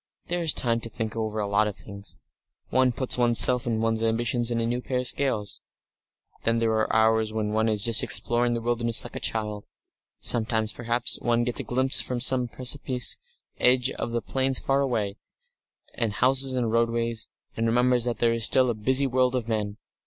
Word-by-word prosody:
"There 175 0 -1
is 165 -2 +4
time 115 -5 +1
to 115 - -6
think 110 0 -5
over 110 -1 -3
a 105 - -1
lot 100 +1 +1
of 105 - -5
things. 100 -1 -10 0.5
One 130 -1 +3
puts 125 +1 0
one's 120 -1 +3
self 125 -1 +5
and 115 -1 -1
one's 115 0 0
ambition 115 +2 0
in 120 -1 -1
a 115 - -1
new 120 +2 -2
pair 125 0 -2
of 125 - -7
scales.... 115 -9 -2 0.8
"Then 115 0 0
there 115 -1 0
are 110 0 0
hours 110 0 +2
when 110 -1 -3
one 110 +1 +1
is 105 -2 0
just 115 -1 +1
exploring 120 +4 0
the 115 - -3
wilderness 115 -1 0
like 120 - -11
a - - -4
child. 105 -2 -3 0.5
Sometimes 110 -1 0
perhaps 120 0 0
one 120 0 0
gets 120 0 +1
a - - -3
glimpse 130 +2 +3
from 125 -1 -4
some 125 0 +5
precipice 125 0 +1 0.4
edge 125 +1 +3
of - - -5
the 120 -1 -3
plains 130 +1 -1
far 135 0 0
away, 110 -7 -2 0.8
and 115 -4 -2
houses 130 +3 +1
and 120 -3 -1
roadways, 115 0 0 0.3
and 115 0 -1
remembers 125 +1 +2
there 120 -1 0
is 115 -1 -2
still 130 +1 +4
a - - -2
busy 130 +6 +1
world 130 0 +1
of 120 -3 -3
men. 105 -2 -3
115 Hz, 195 wpm, -25 LUFS, 110-125 Hz, 0.8 s, self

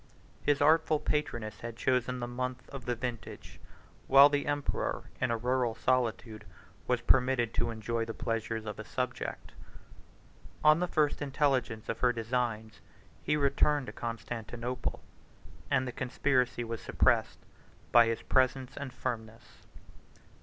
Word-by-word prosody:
His 145 -1 +1
artful 155 0 +4
patroness 120 -10 -2
had 115 -1 -6
chosen 125 0 0
the 120 - -2
month 125 +1 -4
of 135 -3 -8
the 120 - -1
vintage, 120 0 -6 0.5
while 140 +2 +8
the 145 -1 -1
emperor, 145 -1 -2
in 130 - +2
a 115 - +1
rural 125 0 0
solitude, 115 -3 -1 0.4
was 125 -1 +1
permitted 125 -1 +3
to - - 0
enjoy 115 +1 -2
the 115 - -5
pleasures 115 -1 -3
of 105 -1 -6
a - - -4
subject. 125 +2 -4 1.1
On 155 +1 +6
the 180 - 0
first 150 -4 +1
intelligence 130 -6 0
of 115 - -3
her 125 - +4
designs, 115 -2 -2 0.4
he 150 - +1
returned 145 0 +2
to - - -8
Constantinople, 120 +1 -5 0.7
and 130 -2 +1
the - - -3
conspiracy 125 -1 0
was 115 -1 -5
suppressed - - +2 0.5
by 120 -1 +7
his 115 0 -2
presence 130 0 +1
and 140 -2 -6
firmness. 115 -3 -6
125 Hz, 140 wpm, -31 LUFS, 115-135 Hz, 1.1 s, while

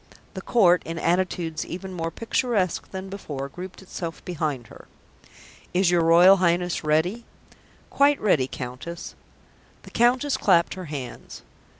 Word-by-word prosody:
The - - -6
Court, 180 -7 +4
in 165 0 -6
attitudes 170 -2 -1
even 185 +2 -7
more 165 -2 -3
picturesque 225 -2 -1
than 190 0 -6
before, 145 -8 -6
grouped 185 +6 -9
itself 170 -3 -7
behind 155 -8 -3
her. - - -14 0.9
"Is 180 -1 +3
your 175 -1 +3
Royal 175 +4 +7
Highness 175 -1 +1
ready?" 160 +9 +1 0.7
"Quite 285 +1 +3
ready, 150 -11 +2
Countess." 130 +7 -7 0.7
The - - -13
Countess 250 +4 +2
clapped 170 -4 +3
her 185 -1 -7
hands. 145 -5 -8
175 Hz, 130 wpm, -24 LUFS, 165-190 Hz, 0.9 s, Royal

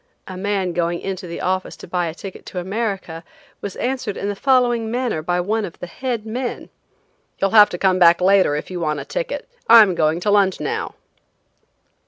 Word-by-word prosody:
A 185 - -7
man 190 -1 -1
going 170 0 -1
into 190 -1 -5
the 170 - -6
office 185 +1 -2
to - - -11
buy 175 0 -1
a 160 - -6
ticket 190 +1 -9
to - - -8
America, 190 -4 -4 0.4
was 200 - -5
answered 250 -5 -3
in 200 - -3
the 205 - -3
following 240 -2 +2
manner 240 -8 -1
by 175 +2 -1
one 215 +5 -1
of 175 - -7
the - - -7
head 235 +3 -4
men: 240 +3 -5 0.7
"You'll 195 - 0
have 210 -2 +7
to 175 - -5
come 185 0 +2
back 170 -1 +6
later 185 -4 +4
if 150 - -5
you 180 - -4
want 150 -3 -1
a - - -7
ticket. - - -4 0.2
I'm 220 -5 +8
going 160 0 +1
to 205 - +1
lunch 200 -2 +3
now." 445 0 -3
195 Hz, 200 wpm, -20 LUFS, 175-225 Hz, 0.7 s, I'm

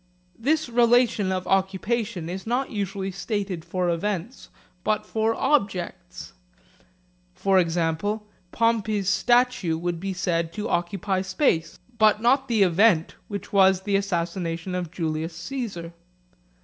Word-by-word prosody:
This 310 +6 +1
relation 235 -4 +3
of 185 -1 -2
occupation 195 0 0
is 190 +4 -6
not 255 +4 -1
usually 195 -2 -3
stated 195 -2 -3
for 180 +1 -2
events 190 +6 -3 0.3
but 215 0 0
for 220 +1 0
objects. 195 - -1 1.0
For 190 +1 +3
example, 175 +5 0 0.3
Pompey's 220 -4 +1
statue 240 -7 +2
would 175 0 -3
be 195 +2 -3
said 170 -2 -1
to 210 +3 -3
occupy 185 +2 -1
space, 190 - 0 0.2
but 215 -1 +5
not 265 +4 +3
the 225 -5 +3
event 180 -1 +3
which 200 -1 -7
was 190 -1 +5
the 200 0 0
assassination 175 -2 -2
of 180 -2 -3
Julius 160 0 -3
Caesar. 175 -4 -5
195 Hz, 125 wpm, -25 LUFS, 175-220 Hz, 1.0 s, but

